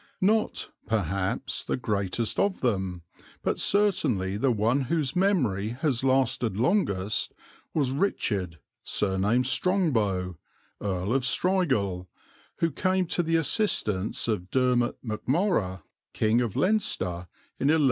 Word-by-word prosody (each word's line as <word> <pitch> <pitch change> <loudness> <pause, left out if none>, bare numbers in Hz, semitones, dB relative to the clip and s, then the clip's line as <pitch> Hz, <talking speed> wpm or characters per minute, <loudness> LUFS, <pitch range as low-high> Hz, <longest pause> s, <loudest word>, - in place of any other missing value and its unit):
Not, 215 +3 +1 0.2
perhaps, 95 -3 -1
the - - -2
greatest 105 -1 -1
of 200 -2 +1
them, 95 -7 -1 0.4
but - - 0
certainly 140 - +2
the 130 +6 +1
one 115 +4 +2
whose 150 -6 0
memory 125 - +1
has 130 -5 +1
lasted 130 -5 +1
longest, 110 - +1 0.4
was 140 -5 +1
"Richard, 100 - -1 0.3
surnamed 105 +5 +1
Strongbow, 110 - 0 0.4
Earl 95 +1 -1
of 135 - +2
Strigul," 125 - +1 0.5
who 165 - 0
came 185 +5 +1
to - - +2
the 165 -1 0
assistance 135 - +1
of 100 -5 -2
Dermot 125 -2 +1
Macmorrogh, 110 - 0 0.3
King 110 +3 +2
of 115 -5 -2
Leinster, 95 - 0 0.3
in 135 - +1
1172. 160 +1 +4
120 Hz, 115 wpm, -27 LUFS, 100-160 Hz, 0.5 s, 1172